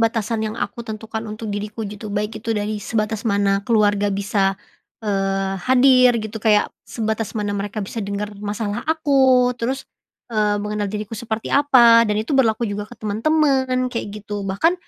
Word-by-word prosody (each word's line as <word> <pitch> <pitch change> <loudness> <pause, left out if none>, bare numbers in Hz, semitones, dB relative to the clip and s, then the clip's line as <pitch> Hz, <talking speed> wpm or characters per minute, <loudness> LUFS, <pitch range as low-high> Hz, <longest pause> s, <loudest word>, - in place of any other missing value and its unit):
batasan 225 -1 0
yang 215 +1 -4
aku 235 - -4
tentukan 220 0 -5
untuk 215 +1 -6
diriku 210 +2 -4
gitu 210 0 -7
baik 210 +1 -2
itu 230 - -3
dari 210 0 -2
sebatas 215 -1 -2
mana 200 -2 +1
keluarga 205 -2 +2
bisa, 195 0 +1 0.5
eee, 195 -1 -1
hadir 255 -1 +6
gitu 220 0 -6
kayak 210 -2 +4 0.2
sebatas 220 -1 -3
mana 205 -1 -1
mereka 205 +2 -4
bisa 195 +4 -6
dengar 200 +1 -3
masalah 205 0 -3
aku 270 -5 +3
terus, 260 +3 -3 0.4
eee, 210 -2 +1
mengenal 210 0 -2
diriku 210 +1 -4
seperti 220 -1 -4
apa? 240 -5 +6
Dan 210 - 0
itu 220 - -6
berlaku 235 -3 +2
juga 205 0 -4
ke 240 - -10
teman-teman 255 +3 +1
kayak 230 - -3 0.2
gitu 205 -1 -5
bahkan, 200 - +2
215 Hz, 160 wpm, -21 LUFS, 205-235 Hz, 0.5 s, hadir